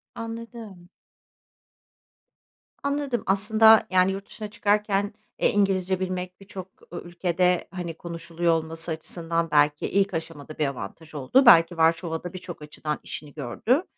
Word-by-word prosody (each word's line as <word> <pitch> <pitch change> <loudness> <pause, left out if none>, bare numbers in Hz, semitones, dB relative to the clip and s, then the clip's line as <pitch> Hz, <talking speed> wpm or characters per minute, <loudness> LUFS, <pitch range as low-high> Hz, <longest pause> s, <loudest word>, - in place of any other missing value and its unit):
Anladım. 230 -5 -8 1.9
Anladım, 280 -4 -1
aslında, 220 +3 +5
yani, 185 +1 +4
yurt 195 +1 -5
dışına 215 -2 -7
çıkarken, 205 -1 0 0.3
eee, - - +3
İngilizce 190 -2 +1
bilmek 185 -1 -4
birçok 190 -1 -8 0.3
ü - - -5
ülkede, 175 +1 0
hani, 175 -3 -5
konuşuluyor 170 0 -2
olması 165 +1 -2
açısından 165 0 -2
belki 150 0 +3
ilk 200 0 +1
aşamada 160 -2 -6
bir 150 -2 +1
avantaj 140 +5 -7
oldu. 145 - +3
Belki 165 -5 +7
Varşova'da 165 +1 +1
birçok 180 -3 -8
açıdan 150 0 -5
işini 145 -2 -8
gördü. 160 - 0
180 Hz, 125 wpm, -25 LUFS, 165-200 Hz, 1.9 s, Belki